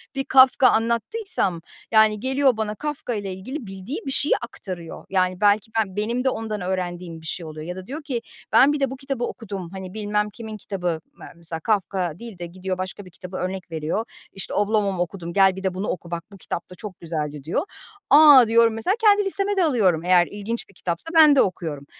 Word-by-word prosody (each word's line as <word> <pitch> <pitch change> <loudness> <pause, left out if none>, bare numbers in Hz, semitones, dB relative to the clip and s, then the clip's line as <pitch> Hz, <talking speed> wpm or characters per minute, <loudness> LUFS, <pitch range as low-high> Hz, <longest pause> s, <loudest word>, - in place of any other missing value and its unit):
Bir 270 - -1
Kafka 260 0 +6
anlattıysam, 230 - 0 0.3
yani, 220 -1 +5
geliyor 265 0 +2
bana 215 -1 -2
Kafka 295 -2 -4
ile 200 -3 -4
ilgili 225 +6 -7
bildiği 195 +8 -6
bir 270 - -2
şeyi 285 - +2
aktarıyor. 185 -7 -8
Yani, 185 0 0
belki 210 +2 +3
ben 195 -3 -1
benim 235 +4 -1
de 260 - +3
ondan 220 -4 -4
öğrendiğim 180 -2 -3
bir - - -14
şey 165 +1 -5
oluyor. 155 0 -8
Ya 180 - -5
da 185 0 -9
diyor 295 +4 -6
ki 250 -4 -3 0.3
ben 285 +2 +6
bir 295 - -2
de 275 - +1
bu 265 - -6
kitabı 270 -2 -4
okudum. 195 -7 -5
Hani 190 -1 -8
bilmem 210 0 -1
kimin 220 0 -8
kitabı 180 -5 -3
me - - -13
mesela, 165 -1 -7
Kafka 185 -3 -1
değil 230 -6 -10
de 175 - -4
gidiyor, 185 +2 -5
başka 185 +2 -6
bir 180 - -14
kitabı 180 +1 -8
örnek 185 -1 -4
veriyor. 160 +8 -2 0.3
İşte 195 - -6
"Oblomov 205 -2 +1
okudum, 170 -1 -7
gel, 195 -1 +5
bir 190 - -8
de 190 -1 0
bunu 190 +3 -3
oku. 175 -1 -5
Bak, 170 -1 -3
bu 200 - -12
kitap 170 - -6
da 180 - -11
çok 195 -1 -9
güzeldi." 150 -4 -4
diyor. 165 - -1 0.5
A, 290 -4 +9
diyorum. 230 0 +4
Mesela, 225 - 0
kendi 415 -2 +5
listeme 395 +1 0
de 375 - +4
alıyorum. 200 - +2
Eğer 180 -1 +4
ilginç 210 +3 -5
bir - - -19
kitapsa 175 - -4
ben 305 -3 +8
de 270 - +6
okuyorum. 160 -6 -3
200 Hz, 210 wpm, -23 LUFS, 180-235 Hz, 0.5 s, A